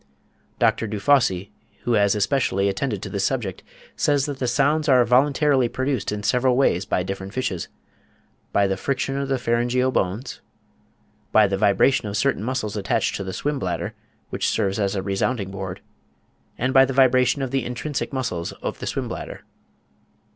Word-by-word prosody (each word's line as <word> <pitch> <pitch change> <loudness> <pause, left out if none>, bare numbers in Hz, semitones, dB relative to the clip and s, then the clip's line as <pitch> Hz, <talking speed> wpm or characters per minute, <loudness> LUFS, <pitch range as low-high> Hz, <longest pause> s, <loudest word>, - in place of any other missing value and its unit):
Dr. 115 - +2
Dufosse, 100 -3 +2 0.3
who 120 - 0
has 100 -1 +3
especially 100 -3 +1
attended 105 0 -2
to - - -5
this 100 -2 -1
subject, 110 -6 -2 0.3
says 145 -2 +2
that 145 -2 -5
the 125 - -1
sounds 145 +5 +2
are 125 -2 +5
voluntarily 135 +1 +3
produced 130 -4 -2
in 105 0 -4
several 125 +4 +2
ways 100 -9 +2
by 90 - 0
different 95 +2 -6
fishes: 100 -9 -2 0.8
by 100 - +3
the 95 -1 0
friction 135 +4 -2
of 140 0 -2
the 135 - +1
pharyngeal 120 +2 +1
bones—by 105 +1 -3
the 100 -1 0
vibration 105 +4 +3
of 100 0 -3
certain 105 -2 +1
muscles 120 -4 -2
attached 100 -2 0
to - - -4
the 95 - -5
swim 145 +8 -2
bladder, - - -3 0.4
which - - 0
serves 100 +2 0
as 100 -1 0
a 95 - -2
resounding 100 +1 -1
board—and 100 +6 -7
by 135 0 +8
the 135 0 -1
vibration 130 +1 +3
of 130 - -3
the 135 -2 0
intrinsic 125 +4 -4
muscles 115 -11 -3
of - - -6
the - - -5
swim - - -2
bladder. - - -7
120 Hz, 165 wpm, -23 LUFS, 100-135 Hz, 0.8 s, by